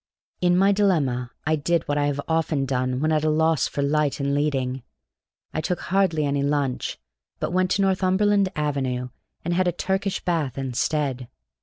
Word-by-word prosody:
In 175 Hz, 0 st, +3 dB
my 195 Hz, +2 st, +5 dB
dilemma 150 Hz, -12 st, +1 dB, 0.2 s
I 155 Hz, +1 st, +2 dB
did 165 Hz, +2 st, 0 dB
what 145 Hz, 0 st, 0 dB
I 145 Hz, -, +2 dB
have 145 Hz, -1 st, -1 dB
often 160 Hz, -3 st, 0 dB
done 130 Hz, 0 st, -1 dB
when 155 Hz, +1 st, +1 dB
at 155 Hz, -1 st, +2 dB
a 155 Hz, -, +2 dB
loss 160 Hz, -2 st, +2 dB
for 140 Hz, -, -2 dB
light 145 Hz, 0 st, +1 dB
and 140 Hz, 0 st, 0 dB
leading. 135 Hz, -3 st, 0 dB, 0.7 s
I 155 Hz, -, -1 dB
took 180 Hz, +2 st, -2 dB
hardly 180 Hz, -5 st, +1 dB
any 140 Hz, 0 st, 0 dB
lunch, 140 Hz, -2 st, -1 dB, 0.4 s
but -, -, -2 dB
went 185 Hz, 0 st, +2 dB
to 200 Hz, -, +2 dB
Northumberland 195 Hz, +1 st, +2 dB
Avenue 130 Hz, -4 st, -1 dB, 0.4 s
and 175 Hz, -, 0 dB
had 185 Hz, +1 st, +2 dB
a -, -, +3 dB
Turkish 190 Hz, +3 st, -1 dB
bath 160 Hz, -8 st, -1 dB
instead. 135 Hz, 0 st, -1 dB
150 Hz, 175 wpm, -24 LUFS, 140-180 Hz, 0.7 s, my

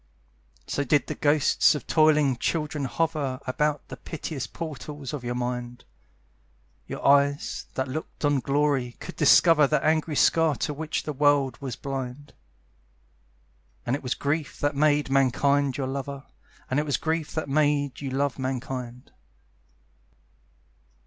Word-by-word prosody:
So 140 Hz, -, -1 dB
did 145 Hz, +1 st, +2 dB
the -, -, -4 dB
ghosts 145 Hz, 0 st, +3 dB
of 145 Hz, -, -5 dB
toiling 150 Hz, -5 st, +3 dB
children 150 Hz, +1 st, -2 dB
hover 140 Hz, -2 st, -1 dB
About 145 Hz, +3 st, -1 dB
the -, -, -7 dB
piteous 155 Hz, -4 st, -5 dB
portals 150 Hz, -3 st, -7 dB
of 145 Hz, -4 st, -5 dB
your 120 Hz, 0 st, -3 dB
mind; 125 Hz, 0 st, -4 dB, 1.0 s
Your -, -, -6 dB
eyes, 140 Hz, 0 st, +2 dB
that 130 Hz, 0 st, -1 dB
looked 150 Hz, +2 st, -5 dB
on 145 Hz, -1 st, +3 dB
glory, 135 Hz, -2 st, 0 dB
could -, -, -8 dB
discover 155 Hz, 0 st, +6 dB
The 150 Hz, -, 0 dB
angry 155 Hz, 0 st, +1 dB
scar 160 Hz, 0 st, +3 dB
to 150 Hz, -, -2 dB
which 155 Hz, +2 st, -3 dB
the 150 Hz, -, -4 dB
world 145 Hz, -3 st, +2 dB
was 130 Hz, -3 st, -4 dB
blind: 135 Hz, 0 st, -6 dB, 1.5 s
And 120 Hz, -, +1 dB
it 145 Hz, -, -6 dB
was 125 Hz, -1 st, -2 dB
grief 145 Hz, +1 st, -2 dB
that 145 Hz, 0 st, 0 dB
made 145 Hz, -1 st, +2 dB
Mankind 135 Hz, +1 st, +2 dB
your 135 Hz, -, -2 dB
lover, 140 Hz, +1 st, -5 dB, 0.4 s
And 130 Hz, -, 0 dB
it -, -, +1 dB
was 145 Hz, -, +1 dB
grief 160 Hz, -1 st, -2 dB
that 155 Hz, -, -2 dB
made 145 Hz, -2 st, +1 dB
you 140 Hz, -, -3 dB
love 135 Hz, +1 st, -1 dB
Mankind. 130 Hz, -1 st, -5 dB
140 Hz, 140 wpm, -26 LUFS, 130-150 Hz, 1.5 s, discover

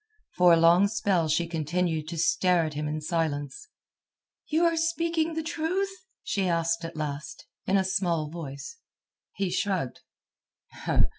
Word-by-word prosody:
For 180 Hz, -1 st, +6 dB
a 165 Hz, -, +7 dB
long 170 Hz, +4 st, +6 dB
spell 200 Hz, -6 st, +1 dB
she 170 Hz, +3 st, +2 dB
continued 165 Hz, 0 st, -1 dB
to 165 Hz, +1 st, -5 dB
stare 170 Hz, +1 st, +3 dB
at 155 Hz, -, -4 dB
him 150 Hz, +1 st, -3 dB
in 155 Hz, +1 st, -3 dB
silence. 150 Hz, -, -2 dB, 0.8 s
"You 320 Hz, +2 st, +2 dB
are 335 Hz, 0 st, +3 dB
speaking 330 Hz, 0 st, 0 dB
the 320 Hz, -, -2 dB
truth?" 340 Hz, +5 st, -1 dB, 0.3 s
she 195 Hz, -2 st, 0 dB
asked 165 Hz, 0 st, 0 dB
at 165 Hz, -, -6 dB
last, 150 Hz, -1 st, -5 dB, 0.2 s
in 195 Hz, -, +3 dB
a 190 Hz, -, +3 dB
small 175 Hz, -5 st, 0 dB
voice. 160 Hz, -, -7 dB, 0.6 s
He 195 Hz, -2 st, -1 dB
shrugged. 185 Hz, -11 st, -1 dB
175 Hz, 145 wpm, -27 LUFS, 160-205 Hz, 0.8 s, a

